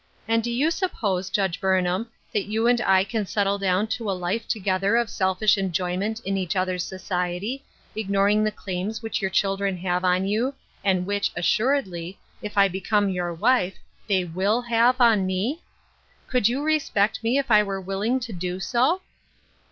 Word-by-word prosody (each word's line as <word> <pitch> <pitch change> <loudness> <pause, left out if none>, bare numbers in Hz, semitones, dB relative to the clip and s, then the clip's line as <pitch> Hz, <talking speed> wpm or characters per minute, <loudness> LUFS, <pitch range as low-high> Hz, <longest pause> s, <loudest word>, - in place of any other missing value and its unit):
"And 225 0 +2
do 240 - -2
you 270 +7 +1
suppose, 200 - -1
Judge 190 -3 -1
Burnham, 190 +3 +1 0.2
that 210 - 0
you 220 +2 0
and 240 0 +3
I 190 -4 +4
can 215 +2 -2
settle 200 0 0
down 190 +1 +1
to 220 -1 -3
a 190 - -1
life 185 +6 -2
together 195 0 0
of 235 -2 0
selfish 190 +2 +2
enjoyment 190 +3 -1
in 195 -1 -2
each 185 -2 -2
others' 185 -1 0
society, 185 +7 -3 0.3
ignoring 205 0 +2
the 215 - +2
claims 200 +2 -5
which 225 - -2
your 190 - 0
children 195 0 0
have 180 0 -1
on 185 +1 +2
you, 230 +7 0 0.3
and 185 -2 +1
which, 200 +1 0
assuredly, 190 -3 0 0.2
if 210 -1 -7
I 200 0 +6
become 195 +2 0
your 180 -2 -2
wife, 195 +1 +2 0.3
they 190 -2 +2
will 195 +8 0
have 240 +2 +3
on 220 -6 +4
me? 210 - -1 0.7
Could 250 -6 +2
you 265 +4 -2
respect 285 -11 +1
me 235 +4 +2
if 270 -3 -1
I 210 -1 +7
were 195 -2 -3
willing 195 +7 -1
to 235 -3 -6
do 180 +1 -4
so?" 260 - +1
200 Hz, 175 wpm, -24 LUFS, 185-225 Hz, 0.7 s, I